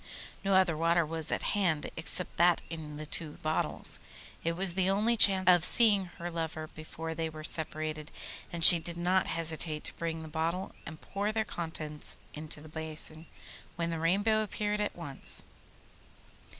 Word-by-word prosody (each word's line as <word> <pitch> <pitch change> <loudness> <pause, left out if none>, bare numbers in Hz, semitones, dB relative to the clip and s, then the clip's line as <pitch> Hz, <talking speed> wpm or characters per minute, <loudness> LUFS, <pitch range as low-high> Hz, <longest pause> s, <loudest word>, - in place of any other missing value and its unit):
No 195 -1 +1
other 185 -4 +3
water 165 +1 +2
was 160 0 -4
at - - -2
hand 175 -7 -1
except 165 +2 -1
that 175 0 +3
in 155 -2 -7
the 155 - -7
two 150 0 -4
bottles. 155 0 +4 0.4
It 165 - 0
was 180 +1 +1
the 190 +1 0
only 215 +4 +1
chance 195 -3 +4
of 175 -2 +6
seeing 205 -1 +5
her 175 +1 -6
lover 160 -1 -4
before 155 +1 -8
they 160 0 -3
were 155 0 -10
separated, 155 -1 -2 0.4
and 170 -1 +5
she 175 - +12
did 170 +1 -7
not 180 +2 +1
hesitate 160 -1 -1
to - - -2
break 165 -1 -4
the - - -9
bottle 165 +4 -3 0.2
and 155 -1 -9
pour 200 +2 -3
their 220 0 -1
contents 155 -4 -3 0.2
into 155 -1 -5
the 155 - -12
basin, 155 0 -2 0.5
when 170 0 -3
the 165 - -3
Rainbow 205 +6 +1
appeared 210 0 -2
at 210 - -3
once. 145 -6 -1
165 Hz, 170 wpm, -30 LUFS, 155-185 Hz, 0.5 s, she